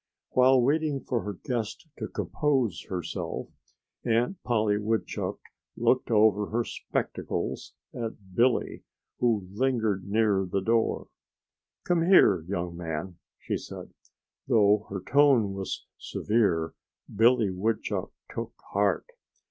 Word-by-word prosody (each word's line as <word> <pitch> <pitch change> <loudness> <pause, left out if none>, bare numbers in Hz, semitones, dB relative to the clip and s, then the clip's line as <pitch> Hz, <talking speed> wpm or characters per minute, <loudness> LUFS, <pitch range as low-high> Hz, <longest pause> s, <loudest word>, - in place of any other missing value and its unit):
While 130 +1 +5
waiting 145 0 +1
for 120 -3 -1
her 105 - -4
guest 120 - -4
to - - -3
compose 135 - -1
herself, 90 -3 -4 0.5
Aunt 120 +10 +1
Polly 105 -3 +1
Woodchuck 110 +1 -2 0.4
looked 130 - +2
over 105 -2 +4
her 120 +2 0
spectacles - - -4 0.2
at 110 -5 -6
Billy, 120 +5 +2 0.4
who 110 -6 +1
lingered 110 -4 0
near 105 -2 +3
the 100 - +1
door. 115 +3 +1 0.7
"Come 175 -2 +2
here, 105 - +6
young 90 -2 -3
man!" 85 +1 -5 0.2
she - - -3
said. - - -9 0.5
Though 105 -3 +4
her 95 -1 -4
tone 130 -3 +4
was 95 -1 -5
severe, 95 -8 0 0.4
Billy 115 -1 +4
Woodchuck 105 +5 -2 0.2
took - - -5 0.2
heart. - - +1
110 Hz, 115 wpm, -28 LUFS, 100-125 Hz, 0.7 s, here